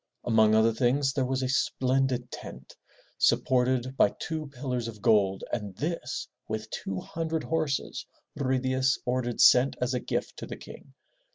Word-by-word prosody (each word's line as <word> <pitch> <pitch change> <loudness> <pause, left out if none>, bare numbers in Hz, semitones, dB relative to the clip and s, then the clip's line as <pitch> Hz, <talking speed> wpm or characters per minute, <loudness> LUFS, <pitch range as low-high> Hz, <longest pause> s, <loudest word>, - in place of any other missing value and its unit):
Among 110 -2 +4
other 110 +1 +4
things 130 +4 +1
there 135 -3 0
was 130 0 -1
a - - 0
splendid 130 -1 0
tent, 65 +1 -9 0.4
supported 130 0 +2
by 105 - +5
two 155 -2 -4
pillars 125 -3 -4
of 110 -2 -8
gold, 100 -2 +3
and 105 -5 -3
this, 150 - -3 0.2
with 110 0 -4
two 95 -1 -4
hundred 160 -1 -3
horses, 155 -4 -2 0.3
Ruy 130 -2 0
Diaz 130 0 +1
ordered 125 -1 -1
sent 125 +2 +6
as 125 +1 0
a 125 - 0
gift - - -3
to - - -7
the - - -7
King. - - -13
130 Hz, 160 wpm, -28 LUFS, 115-135 Hz, 0.4 s, sent